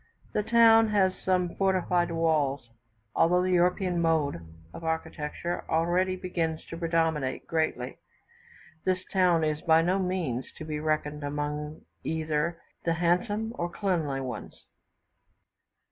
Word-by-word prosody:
The - - +2
town 225 0 +6
has 195 -3 +3
some 180 -2 +1
fortified 185 -2 +2
walls. 150 -6 +1 0.5
Although 180 +2 +4
the 185 - 0
European 180 0 +2
mode 155 - +1 0.3
of - - -9
architecture 160 +1 -3
already 175 +3 +1
begins 170 -3 -3
to 165 - -5
predominate 165 -5 0
greatly, 160 -6 -2 0.8
this 185 0 0
town 180 -4 +4
is 155 0 0
by 160 0 +4
no 185 +3 +1
means 180 -10 -2
to 155 - -7
be 155 -1 -3
reckoned 150 -1 -1
among 150 +1 -4 0.2
either 160 +1 -1 0.2
the 165 - +1
handsome 205 +7 0
or 170 - -1
cleanly 165 -9 -1
ones. 130 -2 -7
165 Hz, 125 wpm, -28 LUFS, 155-185 Hz, 0.8 s, town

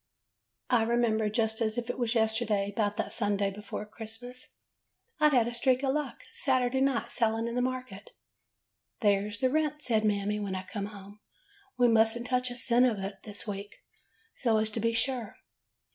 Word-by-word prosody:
"I 240 -2 +5
remember, 225 -2 +2
just 220 +1 0
as 220 0 0
if 240 -1 -2
it 245 - -4
was 240 -1 0
yesterday, 220 -3 +1
'bout 205 -2 0
that - - -2
Sunday 205 -2 0
before 210 +1 -6
Christmas. 225 +3 -8 0.7
I 305 0 +6
'd - - -2
had 240 -3 +4
a 240 - -3
streak 255 +2 +2
of 265 -1 +2
luck 295 -4 -3
Sat'day 260 -1 +1
night 270 -3 +1
selling 225 -1 +1
in 235 - -3
the 250 - +1
market. 250 -6 -4 0.5
'' - - -44
*There 205 0 +3
's 205 - -6
the 255 +3 +1
rent,' 300 0 0
says 220 -3 +2
Mammy, 210 0 +1
when 200 -2 -3
I 185 - -4
come 200 +2 -5
home. 205 0 -12 0.6
*We 245 -1 +5
must 225 0 +4
n't 240 - -6
touch 250 0 +1
a 245 - -6
cent 245 0 +4
of 225 -4 0
it 195 0 -5
this 205 -1 -6
week, 200 -1 -6 0.6
so 230 -4 +1
as 215 0 0
to 225 - -3
be 230 +1 +1
sure. 230 -1 -1
225 Hz, 195 wpm, -30 LUFS, 210-250 Hz, 0.7 s, I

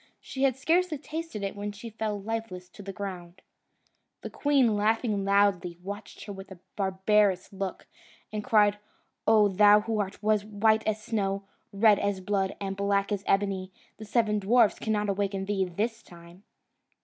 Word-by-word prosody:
She 265 - -7
had 270 -3 +3
scarcely 330 +3 +1
tasted 310 -6 -6
it, 195 - -3
when 205 0 -4
she 210 +3 -9
fell 215 -1 -3
lifeless 200 -4 -5
to 205 - -13
the 195 0 -6
ground. 185 -2 -7 0.8
The - - -7
queen, 270 -7 +2
laughing 215 0 +1
loudly, 195 -3 +2
watched 205 +1 -8
her 205 - -6
with 195 -1 -10
a 190 - -10 0.2
barbarous 190 0 +1
look, 195 -1 -5 0.5
and 210 -1 -3
cried, 210 -1 +3 0.5
"O 215 -1 +6
thou 205 +2 +6
who 220 0 -2
art 195 -1 -2
white 215 +1 +2
as 215 0 -1
snow, 200 -4 -1 0.3
red 205 0 +4
as 200 -1 -1
blood, 190 0 -1
and 195 -1 -4
black 200 +1 0
as 200 -1 -2
ebony, 195 -1 0 0.3
the 220 - -9
seven 215 -1 +1
dwarfs 225 +2 +3
cannot 210 -1 -1
awaken 195 -1 -1
thee 195 -1 0
this 220 +6 -3
time!" 170 +1 -16
205 Hz, 160 wpm, -28 LUFS, 195-220 Hz, 0.8 s, O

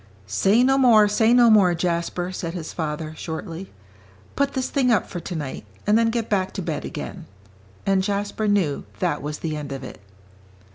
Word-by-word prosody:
"Say 195 - +3
no 270 +1 +3
more, 225 -5 +6
say 220 +2 +3
no 240 -1 +6
more, 190 -5 +5
Jasper," 175 +1 -1
said 170 -2 -5
his 165 -3 -6
father, 155 -1 -4
shortly; 165 +3 -6 0.6
"put 280 0 +1
this 260 -1 -1
thing 265 -3 +1
up 215 - +3
for 175 - -6
tonight, 155 -5 -5 0.2
and 210 - +3
then 230 0 +4
get 230 -1 -2
back 190 -3 0
to - - -4
bed - - -3
again." - - -7 0.6
And 195 -1 +3
Jasper 205 +2 -2
knew 190 -9 +1
that 150 - -1
was 150 +1 -4
the 155 -2 -3
end 145 -2 -6
of 135 -1 -5
it. - - -9
190 Hz, 185 wpm, -23 LUFS, 160-220 Hz, 0.6 s, more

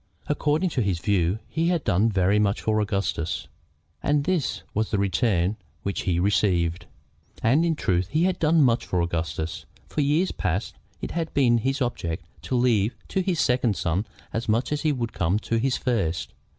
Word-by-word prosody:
According 150 +4 +1
to 130 - 0
his 100 -5 0
view, 90 0 +1
he 165 +1 0
had 175 -3 +1
done 105 +2 +3
very 100 0 +2
much 100 -1 +1
for 110 -1 +1
Augustus, 100 -5 -2 0.5
and 145 0 +2
this 145 - -1
was 110 +1 0
the 105 - 0
return 100 0 +1 0.3
which 100 - -2
he 85 -1 +2
received! 90 -3 +1 0.6
And 130 +8 +4
in 165 -1 +1
truth 90 - 0
he 155 - +1
had 185 0 +1
done 160 0 +4
much 120 -2 +3
for 90 - -1
Augustus. 85 -1 -3 0.2
For 150 - -2
years 150 +6 +2
past 95 +3 -2 0.3
it - - -4
had 165 -1 -2
been 120 -4 +4
his 135 +4 0
object 85 -8 -3 0.2
to 130 - -1
leave 120 -3 +2
to 190 - 0
his 180 -3 -1
second 125 -5 +2
son 90 +6 -1 0.3
as 115 0 -3
much 115 +6 +1
as 150 +1 -1
would 130 -7 0
come 90 +3 +1
to 115 +1 -1
his 125 +3 +1
first. 100 -10 -1
110 Hz, 180 wpm, -25 LUFS, 95-145 Hz, 0.6 s, And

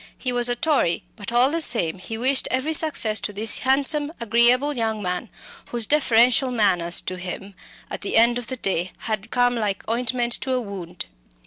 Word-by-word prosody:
He 255 - -3
was 245 0 +1
a 245 - 0
Tory; 265 - 0
but 205 0 -6
all 245 +3 +4
the 330 +1 0
same 190 - +2
he 220 +4 -6
wished 260 +3 +2
every 260 +5 -1
success 285 -9 +2
to - - -4
this 210 +2 -1
handsome, 285 +3 +1
agreeable 240 +5 +3
young 225 -2 -1
man, 180 +3 -4 0.4
whose 235 -2 -3
deferential 255 -2 +3
manners 185 -7 +1
to 185 - -5
him 190 +2 -7 0.3
at - - -6
the 205 - -1
end 235 +2 +4
of 240 - -6
the 260 - -3
day 185 -4 -2
had 215 0 -4
come 245 0 +2
like 210 -4 -3
ointment 240 +1 -1
to 260 - -2
a 255 - +1
wound. 185 -6 -7
235 Hz, 190 wpm, -22 LUFS, 205-255 Hz, 0.4 s, all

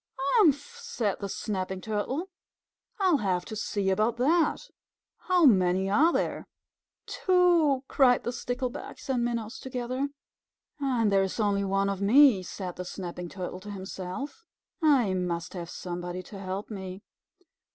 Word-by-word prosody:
"Humph!" 315 - +2
said 240 - -2
the 200 - -4
Snapping 190 -2 -3
Turtle. 245 - -3 0.7
"I'll 370 -5 +4
have 185 -6 -1
to 220 - -6
see 200 -2 -1
about 215 +4 +1
that. 310 +6 +2 0.7
How 360 -3 +5
many 190 -4 +4
are 310 +11 +5
there?" - - -2 0.6
"Two!" 345 -7 +3
cried 250 -3 +4
the 240 - -2
Sticklebacks 250 +2 -5
and 250 -3 +1
Minnows 235 -1 -3
together. 255 +2 -3 0.7
"And 245 -6 +1
there 195 0 +4
is 190 +4 -2
only 200 -2 +2
one 195 0 +1
of 200 -1 -2
me," 235 0 +6
said 180 0 -6
the 180 - -4
Snapping 175 -1 -6
Turtle 185 0 -6
to 205 +2 -10
himself. 195 - -6 0.4
"I 270 -11 +4
must 175 -2 -2
have 170 -3 -6
somebody 175 0 -5
to 195 +2 -10
help 195 +3 -5
me. 190 -1 -7
210 Hz, 140 wpm, -28 LUFS, 190-270 Hz, 0.7 s, me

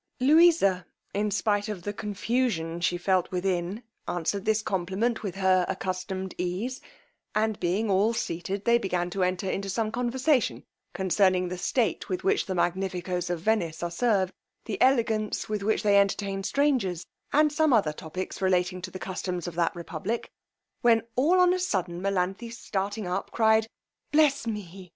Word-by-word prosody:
Louisa, 290 - +5 0.3
in 210 +1 0
spite 205 0 0
of 195 -5 -5
the 205 - -3
confusion 205 -5 -1
she 175 +1 +1
felt 185 0 +1
within, 185 +3 -2 0.2
answered 180 +4 -2
this 215 0 +2
compliment 195 +5 -1
with 195 -4 -4
her 190 -1 +3
accustomed 190 0 -3
ease; 190 +9 -2 0.5
and 215 -1 +1
being 185 +6 0
all 200 +3 +3
seated, 190 -2 -3
they 235 0 +5
began 180 -4 -1
to 195 - -2
enter 185 +1 0
into 195 +1 -2
some 215 +2 -1
conversation 250 +3 +1 0.3
concerning 185 -1 +2
the 180 - -4
state - - 0
with 365 - -2
which 395 - +1
the 190 - -2
Magnifico's 180 0 -1
of 175 -2 -2
Venice 175 -6 0
are 170 - -2
served, 195 -2 +1 0.3
the - - -4
elegance 225 -5 +2
with 210 -1 -2
which 215 +2 0
they 200 -1 +5
entertain 200 0 0
strangers, 215 - 0 0.3
and 300 0 +4
some 315 -1 +3
other 200 -11 +3
topics 175 +6 -6
relating 185 -1 +1
to 185 - -5
the 185 - -7
customs 180 -2 -4
of 175 - -5
that 170 +1 0
republic, 175 +6 -4 0.5
when 230 -2 +4
all 320 +9 +4
on 360 0 +5
a 370 - -1
sudden 180 - -1
Melanthe 195 +4 -1
starting 205 -2 -3
up, 180 +2 -2
cried, 220 -1 +3 0.4
bless 295 -5 +3
me! 190 -4 -6
195 Hz, 160 wpm, -27 LUFS, 180-225 Hz, 0.5 s, Louisa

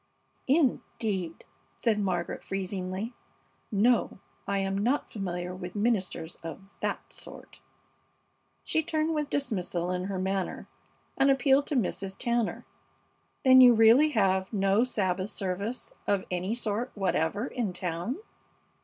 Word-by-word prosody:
'" - - -41
"Indeed!" 220 - 0 0.3
said 220 -3 +1
Margaret, 180 -4 -2
freezingly. 195 +3 -3 0.6
"No, 225 +4 +2 0.3
I 200 - 0
am 195 0 -1
not 240 +9 +1
familiar 180 -3 -4
with 180 0 -7
ministers 205 -6 -1
of 195 +4 -10
that - - -3
sort." - - -9 1.0
She 320 - +1
turned 315 0 0
with 300 -2 -1
dismissal 185 -9 -1
in 180 0 -2
her 195 -1 -3
manner 190 0 -2 0.5
and 270 +1 +5
appealed 270 +1 +4
to 295 - -1
Mrs. 195 -4 -1
Tanner. 235 -2 -1 0.8
"Then 260 0 +9
you 245 -2 +9
really 230 +7 +6
have 190 -7 +1
no 195 +1 +3
Sabbath 190 -5 0
service 200 +4 -3
of 200 -2 +1
any 185 +5 -1
sort 235 +1 -2
whatever 195 +1 0
in 240 -7 -2
town?" 180 +6 -3
200 Hz, 125 wpm, -29 LUFS, 185-245 Hz, 1.0 s, Then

